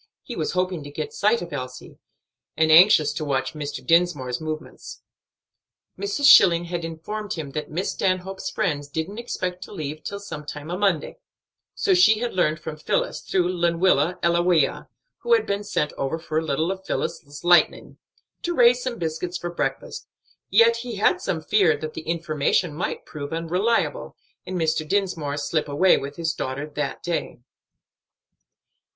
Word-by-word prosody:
He 245 - -7
was 155 - -2
hoping 180 -3 -1
to 145 - -8
get 150 +1 -5
sight 215 0 +2
of 170 - -9
Elsie, 130 -2 -7 0.6
and 160 0 +3
anxious 160 -3 +7
to - - -4
watch 130 -3 -1
Mr. 145 -4 -6
Dinsmore's 155 -6 +2
movements. 155 0 -7 0.9
Mrs. 200 +8 -3
Schilling 175 -11 +8
had 175 0 -4
informed 185 +6 -5
him 155 -4 -6
that 150 +2 -5
"Miss 175 +5 -2
Stanhope's 190 0 -2
friends 150 -9 -2
didn't 160 +9 -4
expect 185 -6 -4
to - - -11
leave 155 -5 -6
till 200 - -5
sometime 150 -4 -7
a - - -1
Monday; 190 -7 0 0.6
so 395 - +2
she 355 -12 +6
had 240 +2 -3
learned 155 -4 +1
from 155 0 -7
Phillis, - - -1
through 180 -2 0
Lenwilla 170 -1 +2
Ellawea, 170 -3 +2 0.3
who 475 - +1
had 455 - +3
been 200 +1 -2
sent 150 -7 -1
over 135 +4 -1
for 160 -1 -2
a - - -4
little 160 +3 0
of 190 0 -6
Phillis's 160 -5 -4
light'ning, 175 0 +3 0.4
to 345 0 -2
raise 245 -1 +5
some 245 -2 -3
biscuits 170 +2 -3
for 175 +1 -5
breakfast," 450 - -3 0.4
yet 230 0 +5
he 235 -1 -6
had 205 - +2
some 160 -3 -2
fear 185 -3 +3
that 155 0 -6
the - - -6
information 165 0 0
might 160 - -4
prove 145 -1 -7
unreliable, 180 +8 -1 0.3
and 185 0 -3
Mr. 160 -1 0
Dinsmore 165 -7 -1
slip 150 +1 -1
away 165 +7 +4
with 140 +1 -5
his 165 -1 -1
daughter 140 -1 -4
that 150 -1 -4
day. 170 -7 -3
170 Hz, 165 wpm, -24 LUFS, 155-195 Hz, 0.9 s, Schilling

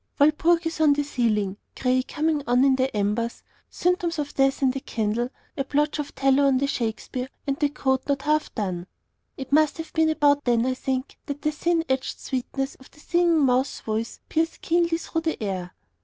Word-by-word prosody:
Walpurgis 325 +2 +3
on 300 -2 +6
the 290 +1 0
ceiling, 215 -8 0 0.2
gray 255 0 +2
coming 305 +3 -1
on 245 +2 +4
in 270 -1 +5
the 260 +1 0
embers, 210 +3 -1 0.3
symptoms 350 -1 0
of 290 -1 -3
death 270 0 +2
in 260 - +4
the 270 - -4
candle, 230 0 -1 0.3
a 275 - -1
blotch 295 +2 0
of 290 -1 -5
tallow 275 +1 +3
on 265 -1 +3
the 275 - +1
Shakespeare, 250 0 -3 0.2
and 275 -1 0
the 290 - +2
coat 265 -2 0
not 280 -1 0
half 305 +1 +1
done. 185 -5 -3 0.5
It 265 0 -7
must 305 +1 +4
have 325 -1 -7
been 320 -1 +3
about 290 -2 +3
then, 240 -1 +2
I 260 - +1
think, 260 +1 -3
that 285 0 -5
the 305 - +2
thin 330 +2 0
edged 265 0 -1
sweetness 270 +1 -3
of 265 - -16
the - - -21
Singing 340 -2 +3
Mouse's 260 +1 +1
voice 220 +1 -3
pierced 325 +1 -1
keenly 340 0 +2
through 325 -1 -3
the 320 -8 -2
air. 185 -3 -4
275 Hz, 195 wpm, -25 LUFS, 250-305 Hz, 0.5 s, on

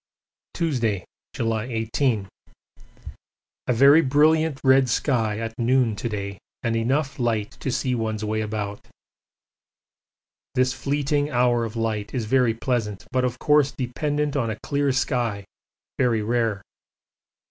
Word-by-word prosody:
Tuesday, 120 - 0 0.3
July 115 -1 -1
18. 115 -2 -1 1.4
A 125 - +3
very 140 +6 +7
brilliant 155 +1 +3
red 130 -1 +5
sky 115 -4 0
at 115 0 -4
noon 120 -2 +2
to 120 - -3
day 100 -2 -5 0.2
and 115 -1 0
enough 135 +5 0
light 110 -4 0
to 135 - -2
see 125 +1 -1
one's 110 -2 -2
way 110 +1 -1
about. 105 -1 -4 1.7
This 130 +1 +2
fleeting 145 +1 0
hour 120 -3 +2
of 110 - -7
light 110 -1 -2
is 120 -4 -1
very 120 -1 +2
pleasant, 115 -5 -2
but 130 0 +1
of 125 -1 -1
course 150 -1 +3
dependent 145 +3 -2
on 120 -5 0
a 110 - -3
clear 140 -1 +1
sky, 120 -6 -1 0.5
very 115 -4 +2
rare. 115 -3 0
120 Hz, 130 wpm, -24 LUFS, 110-135 Hz, 1.7 s, very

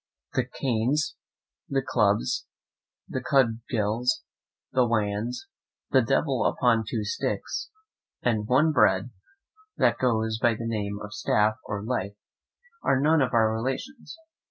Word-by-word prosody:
"N.B. - - +4
The - - -17
Canes, 135 +6 0 0.5
the 135 -2 0
Clubs, 105 +1 +1 0.6
the 130 - -3
Cudgels, 120 -2 +1 0.5
the 125 -2 +3
Wands, 115 - -1 0.4
the 130 - +6
Devil 135 +2 +1
upon 115 -3 +2
two 110 -3 -2
Sticks, 105 - -3 0.5
and 110 -3 +1
one 145 +6 +4
Bread, 95 -5 +3 0.7
that - - +3
goes 110 -3 +1
by 120 -1 +3
the 115 - -6
name 105 -3 -2
of 105 0 -8
Staff 105 0 +2
of 100 0 -3
Life, 100 -5 -2 0.7
are 130 - +2
none 155 +2 +4
of 130 -2 +1
our 110 -1 +4
relations. 135 - -4
115 Hz, 130 wpm, -26 LUFS, 110-130 Hz, 0.7 s, the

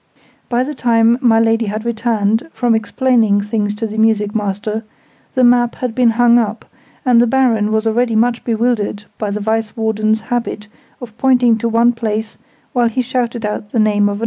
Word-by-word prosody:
By 245 +1 +1
the 295 +3 -5
time 235 -2 +2
my 225 -3 +4
Lady 225 0 +1
had 215 +2 -4
returned, 225 +1 -1
from 245 -2 +1
explaining 220 -1 +1
things 205 0 -2
to 225 +2 -4
the 220 0 -5
music 215 -2 +1
master, 210 +1 -3 0.5
the 255 - +2
map 240 -1 +3
had 250 -3 -4
been 245 0 +3
hung 240 +1 +4
up, 225 -1 -3 0.4
and 245 -2 +5
the 240 - +3
Baron 225 -4 +1
was 220 +1 0
already 230 +1 +1
much 235 +2 +1
bewildered 225 -3 -1 0.2
by 210 - -2
the 205 +1 -3
Vice 220 +2 -2
Warden's 220 0 0
habit 230 -2 -4 0.3
of 230 -4 -10
pointing 250 -3 +3
to 230 - -1
one 235 +1 +3
place 220 -1 -3 0.4
while 240 -3 +2
he 255 +3 -1
shouted 240 -2 -2
out 210 0 -5
the 235 - +1
name 210 -1 +2
of - - -2
another. - - -7
225 Hz, 190 wpm, -16 LUFS, 215-240 Hz, 0.5 s, and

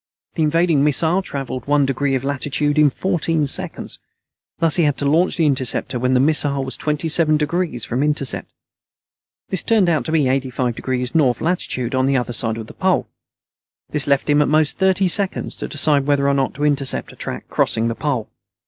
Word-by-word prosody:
The - - -3
invading 160 -1 +2
missile 160 +5 +2
traveled 135 -7 -6
one 145 -1 +3
degree 135 +1 0
of 130 - -2
latitude 145 +2 -1
in 150 -1 +6
fourteen 165 -2 -1
seconds. 135 - -3 0.6
Thus 165 -1 +2
he 170 - +3
had 145 -2 0
to 145 - -2
launch 165 +6 +2
the 165 - +2
interceptor 130 -3 -1
when 130 +1 +1
the - - +4
missile 140 -1 +2
was 130 - -5
twenty 150 +1 -2
seven 155 -1 +3
degrees 155 -4 -2
from 125 +3 -2
intercept. 145 -4 -1 1.0
This 190 - +2
turned 215 -6 +2
out 160 -3 0
to - - -3
be 160 -2 +2
85° 130 -1 -2
North 135 -7 +2
Latitude 150 -8 -2
on 130 0 +1
the 135 -1 +2
other 120 -1 -2
side 115 -1 0
of 110 - -6
the - - -12
Pole. - - 0 0.8
This 150 -2 +1
left 140 -1 +1
him 145 0 +3
at 150 - +2
most 155 +2 +1
thirty 190 0 +2
seconds 195 +2 -1
to - - -5
decide 145 -2 +2
whether 140 -1 +2
or 140 - +3
not 135 -1 -1
to 145 - -4
intercept 140 -2 -1
a - - -16
track 65 - -6
crossing 110 +1 +1
the 115 - -1
Pole. 130 -4 -2
145 Hz, 195 wpm, -19 LUFS, 130-160 Hz, 1.0 s, in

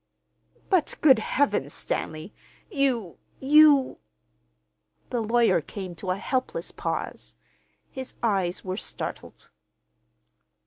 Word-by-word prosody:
"But, 365 -5 +2
good 270 -7 +6
Heavens, 210 - 0
Stanley, 155 +5 -4 0.4
you—you—" 275 - +3 1.1
the 240 - 0
lawyer 225 -5 +3
came 185 +3 -7
to 190 - -6
a 185 - 0
helpless 260 - -3
pause. - - -5 0.6
His 260 -1 -7
eyes 195 -6 0
were 185 0 -3
startled. - - -6
230 Hz, 90 wpm, -26 LUFS, 185-270 Hz, 1.1 s, good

